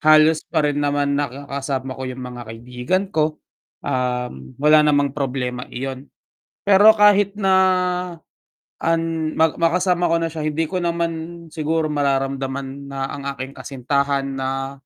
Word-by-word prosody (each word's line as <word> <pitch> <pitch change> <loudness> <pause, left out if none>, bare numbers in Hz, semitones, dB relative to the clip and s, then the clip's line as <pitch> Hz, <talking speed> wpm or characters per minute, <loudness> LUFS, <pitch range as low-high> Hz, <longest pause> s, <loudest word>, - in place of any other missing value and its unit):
Halos 155 +1 +5
pa 155 -3 +1
rin 145 0 0
naman 145 0 +1
nakakasama 135 -1 -3
ko - - -5
yung 130 0 -6
mga 125 -1 -7
kaibigan 125 - -2
ko, 155 0 +1 0.5
um, 125 - -3
wala 150 +2 +5
namang 145 -2 +2
problema 125 -3 -3
iyon. 135 +2 -6 0.6
Pero 205 +2 +7
kahit 205 -1 +5
na 195 -2 +2 1.3
an 165 -1 0
ma 160 -1 +3
makasama 175 +1 +2
ko 170 - +3
na 165 - 0
siya 155 -1 -5
hindi 155 +1 -1
ko 185 - -2
naman 170 -1 -3
siguro 155 0 -1
mararamdaman 135 -1 -2
na 135 0 -3
ang 140 - -6
aking 135 0 -7
kasintahan 140 +1 -1
na 135 +1 -3
145 Hz, 135 wpm, -21 LUFS, 135-165 Hz, 1.3 s, Pero